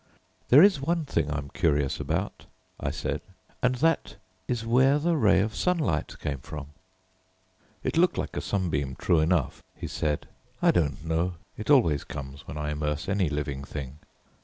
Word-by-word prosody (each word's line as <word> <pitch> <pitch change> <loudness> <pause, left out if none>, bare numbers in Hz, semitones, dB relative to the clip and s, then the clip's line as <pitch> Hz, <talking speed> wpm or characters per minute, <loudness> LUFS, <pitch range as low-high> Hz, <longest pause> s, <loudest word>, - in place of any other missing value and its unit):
"There 140 +7 +9
is 195 -8 +5
one 165 +2 0
thing 80 - 0
I'm 70 -2 -3
curious 75 -6 +1
about," - - -3 0.3
I - - -1
said, - - -3 0.4
"and 125 0 +2
that 165 +6 +1 0.3
is 120 -2 -2
where 130 +5 +4
the 165 +3 +1
ray 100 -9 +4
of 110 +2 -1
sunlight 160 - 0
came 70 -2 -3
from." 75 +2 -8 1.1
"It - - -1
looked 180 +2 +4
like - - -3
a - - -1
sunbeam 75 -9 -1
true 85 - +2
enough," 80 -3 +1
he - - -7
said. 75 -1 -2 0.3
"I - - +5
don't 75 -3 0
know, 85 +2 0 0.2
it 105 - -7
always 95 - +4
comes 70 0 -8
when 75 - -6
I 75 0 -2
immerse 75 0 -2
any 95 -4 +1
living 70 -2 -3
thing. 70 0 -7
80 Hz, 165 wpm, -27 LUFS, -, 1.1 s, There